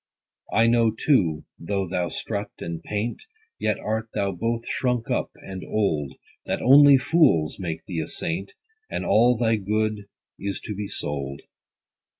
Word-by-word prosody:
I 115 +2 +4
know 115 -1 +4
too, 105 - +1
though 95 +2 -2
thou 90 0 -1
strut 100 -2 -4
and 85 -1 -5
paint, 105 +6 -3 0.4
Yet - - 0
art 110 +1 -3
thou 100 -1 0
both 115 +6 -2
shrunk 125 -3 -1
up, - - 0
and 95 -1 -8
old, 80 -10 -1 0.3
That - - -1
only 140 +2 +8
fools 130 - +3
make 85 -3 -4
thee 85 -3 -4
a - - -5
saint, 90 +4 -3 0.4
And - - -3
all 120 +2 +4
thy 115 -1 +2
good 105 +1 -1 0.3
is 100 0 -3
to 105 - -5
be 100 0 -4
sold. 70 -5 -4
105 Hz, 155 wpm, -24 LUFS, 85-115 Hz, 0.4 s, only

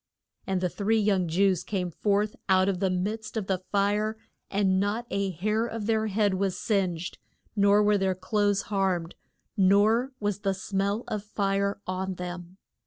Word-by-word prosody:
] - - -44
And 190 -2 0
the 180 - +2
three 215 +5 +1
young 200 -4 +2
Jews 185 +2 +2
came 180 -4 -2
forth 205 +4 0
out 185 0 +4
of 190 -2 0
the 190 - +1
midst 210 +5 -3
of 215 - -1
the 190 -1 0
fire, 210 +2 +1 0.3
and 195 -2 +2
not 205 +4 -1
a 200 0 0
hair 215 +6 0
of 225 -2 -5
their 220 0 +1
head 205 -1 +1
was 190 -1 -1
singed, 180 -5 -1 0.4
nor 200 0 +5
were 210 -1 +3
their 190 -1 +1
clothes 205 +2 +1
harmed, 190 -5 -1 0.4
nor 210 +6 +4
was 205 -2 -1
the 195 -2 0
smell 200 +3 -1
of 210 -2 -3
fire 200 -1 -1
on 185 0 -3
them. 180 0 -7
200 Hz, 175 wpm, -27 LUFS, 185-210 Hz, 0.4 s, nor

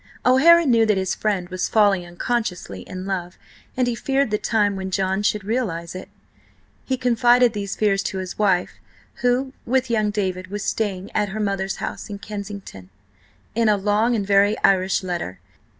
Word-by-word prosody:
O'Hara 330 +7 +6
knew 235 -4 +4
that 210 -2 +2
his 190 -1 0
friend 200 -5 -1
was 185 -1 -2
falling 200 -5 +3
unconsciously 175 - -3
in 185 0 -6
love, 180 -2 -4 0.4
and 255 - +2
he 245 - 0
feared 270 +1 0
the 210 - +1
time 205 -3 +1
when 190 0 -4
John 190 +1 0
should 210 -1 0
realise 195 -7 -2
it. 185 - -8 0.7
He 260 - -2
confided 245 -1 +4
these 200 -2 -4
fears 200 -2 +1
to 195 - -3
his 185 +1 -6
wife, 190 -4 +1 0.4
who, 250 +2 +1
with 255 0 0
young 215 -2 +2
David, 185 -3 -2
was 205 +1 -5
staying 200 -3 -2
at 210 -1 0
her 215 +3 -5
mother's 195 -2 -1
house - - -6
in 205 - -5
Kensington, 200 - -8 0.6
in 230 -1 +2
a 210 - +3
long 210 +4 +1
and 205 -3 -1
very 200 +1 +3
Irish 190 0 +3
letter. 170 - -4
205 Hz, 175 wpm, -22 LUFS, 190-230 Hz, 0.7 s, O'Hara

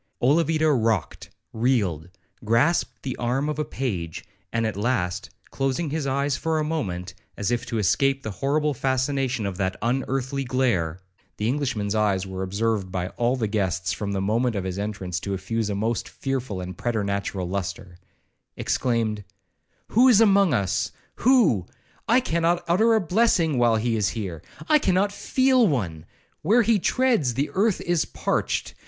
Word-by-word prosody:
Olavida 155 +3 +3
rocked, 115 - 0 0.2
reeled, 105 - 0 0.3
grasped 115 +10 +1
the 130 -2 -3
arm 125 +4 0
of 150 0 -3
a - - +1
page, 95 - -4 0.3
and 115 0 0
at 110 - -2
last, 100 -5 -1 0.2
closing 135 +3 -1
his 155 -2 -2
eyes 140 +1 0
for 160 +2 -1
a 155 - +1
moment, 95 - -3 0.2
as 100 +3 -1
if 120 0 -1
to 115 - -2
escape 135 +8 +2
the 110 - -4
horrible 150 +2 +1
fascination 130 -2 0
of 95 -2 -3
that 95 -1 -1
unearthly 130 +3 -1
glare, 115 -11 0 0.4
(the 105 - -1
Englishman's 120 -6 -1
eyes 100 -3 +1
were 95 0 -6
observed 100 0 -1
by 90 -1 -2
all 120 +4 0
the 120 -4 -1
guests, 95 -3 -1
from 100 +2 -4
the 100 - -1
moment 115 +4 +1
of 100 - -2
his 95 +1 -4
entrance, 95 -4 -3
to 100 +1 -3
effuse 110 +3 -2
a 100 - -1
most 110 +3 -1
fearful 130 -8 -3
and 90 0 -7
preternatural 100 -5 -2
lustre), 90 -1 -5 0.6
exclaimed, 115 -4 0 0.7
'Who 245 +4 +5
is 235 -5 +6
among 200 -5 +5
us?—Who?—I 215 - 0
cannot 170 -5 0
utter 220 +7 +4
a 220 - +3
blessing 175 - +2
while 120 -2 +4
he 115 +1 0
is 105 -3 +1
here. 95 -8 -5 0.3
I 300 - +5
cannot 190 -2 +2
feel 260 +3 +3
one. 90 - -2 0.4
Where 225 +9 +4
he 220 -1 +3
treads, 225 - +1
the 140 +3 -1
earth 205 +1 +2
is 175 -2 +1
parched! - - -2
120 Hz, 160 wpm, -24 LUFS, 100-150 Hz, 0.7 s, is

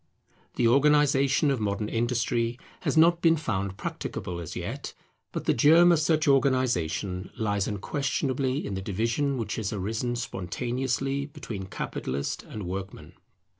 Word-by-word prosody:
The 120 - +3
organization 140 +1 +4
of 135 - 0
modern 105 0 -1
industry 120 0 0 0.2
has - - -1
not 170 +1 +5
been 165 -1 +5
found 100 -9 -2
practicable 90 -2 -5
as 85 - -7
yet; - - -5 0.4
but - - -4
the - - +3
germ 165 +8 +6
of 170 - +4
such 155 0 +2
organization 120 - +1
lies 100 -3 0
unquestionably 135 +5 -1
in - - -4
the 95 - -3
division 115 +8 0
which 115 - -3
has 110 -4 -2
arisen 110 +4 -2
spontaneously 125 +6 -2
between 115 -11 -7
Capitalist 70 -6 -3
and 105 - -8
Workman. 90 -3 -6
120 Hz, 135 wpm, -27 LUFS, 100-140 Hz, 0.4 s, germ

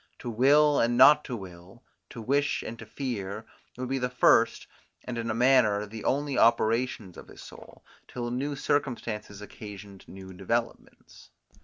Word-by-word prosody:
To 120 - -6
will 145 +5 +4
and 120 +1 +1
not 150 +4 +7
to 125 - -5
will, 95 +2 -12 0.3
to 115 - -9
wish 140 +5 0
and 115 0 -8
to 115 - -10
fear, 110 -5 -5 0.3
would 130 0 -4
be 135 +1 -2
the 125 0 -1
first, 125 - +3 0.4
and 125 - -6
in 115 -1 -4
a 110 - -1
manner, 115 -4 +3
the 110 +1 -9
only 140 0 0
operations 115 -4 +1
of - - -12
his - - -13
soul, - - -14 0.2
till 120 -1 -5
new 140 +4 -3
circumstances 115 -8 -3
occasioned 100 -2 -11
new 95 0 -11
developments. 115 +6 -5
115 Hz, 160 wpm, -27 LUFS, 105-130 Hz, 0.4 s, not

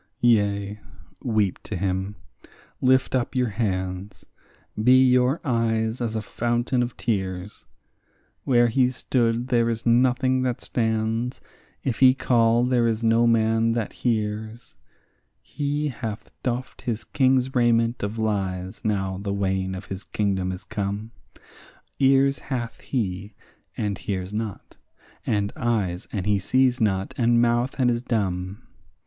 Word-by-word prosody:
Yea, 100 -3 +2 0.4
weep 105 -5 +1
to 110 - -6
him, 95 +2 -2 0.7
lift 130 0 +3
up 130 -1 -1
your 125 -2 +1
hands; 95 -2 -3 0.6
be 130 +2 +6
your 125 +3 +3
eyes 115 -2 0
as 115 -2 -2
a 110 - -2
fountain 120 +4 0
of 120 -1 -3
tears; 95 -3 -3 0.8
Where 120 -2 +4
he 125 +2 +3
stood 120 -1 0
there 115 -2 +3
is 115 0 -3
nothing 130 +2 +3
that 125 -2 -1
stands; 115 +1 -1 0.4
if 130 -4 -2
he 130 -1 +7
call, 115 -2 +3
there 125 -2 +2
is 115 0 -1
no 115 +1 +4
man 115 0 +3
that 115 -3 -2
hears. 110 0 -3 0.7
He 145 +1 -2
hath 115 -4 -6
doffed 125 0 -3
his 115 -3 -3
king's 130 -1 +2
raiment 120 -1 +2
of 100 +2 -3
lies 95 -4 -2
now 95 -4 -1
the 100 0 -3
wane 95 -1 -1
of 95 - -7
his 95 0 -7
kingdom 95 -3 -1
is 90 0 -7
come; 100 +3 -4 0.9
Ears 135 0 +4
hath 120 -4 -4
he, 100 -4 -3 0.4
and 105 -4 -2
hears 95 0 -4
not; 110 -2 -5 0.5
and 100 -1 0
eyes, 105 -7 -1
and 95 -3 -3
he 105 -1 +2
sees 130 +5 +2
not; 95 -3 0
and 120 0 +4
mouth, 120 +2 +2
and 125 -2 +3
is 120 0 -1
dumb. 100 -5 -2
115 Hz, 135 wpm, -24 LUFS, 100-125 Hz, 0.9 s, he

